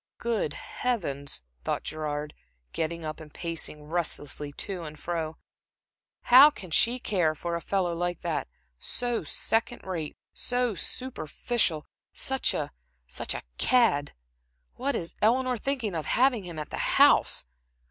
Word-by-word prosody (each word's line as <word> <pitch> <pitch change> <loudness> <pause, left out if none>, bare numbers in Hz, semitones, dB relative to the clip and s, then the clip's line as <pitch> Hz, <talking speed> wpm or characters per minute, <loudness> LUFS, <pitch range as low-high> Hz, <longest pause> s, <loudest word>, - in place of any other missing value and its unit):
"Good 225 -10 0
Heavens," 140 - -2 0.2
thought - - -1
Gerard, 150 -1 -3 0.4
getting 165 0 -2
up 155 +1 -4
and 155 -2 -11
pacing 165 -3 -4
restlessly 150 -3 -2
to 190 +4 -3
and 155 -2 -7
fro 165 -2 -3 0.9
"how 265 +4 +10
can 190 - -10
she 235 +10 +3
care 175 -10 +1
for 170 +2 -3
a 170 - -3
fellow 185 -2 0
like 175 0 -2
that 170 -3 -1 0.3
so 240 -1 -1
second 230 +2 -1
rate, 170 -5 -4 0.2
so 245 -2 +1
superficial, 190 - -1 0.3
such 265 0 +1
a - - -2 0.3
such 60 - -3
a - - -5 0.2
cad? 225 - +3 0.6
What 275 +1 -1
is 170 -6 -3
Eleanor 250 +3 +3
thinking 240 -3 -1
of 160 -2 -2
to - - -4
have 265 +2 +5
him 180 -8 -6
at 150 -1 -5
the - - -3 0.2
house? - - +5
175 Hz, 140 wpm, -28 LUFS, 155-240 Hz, 0.9 s, how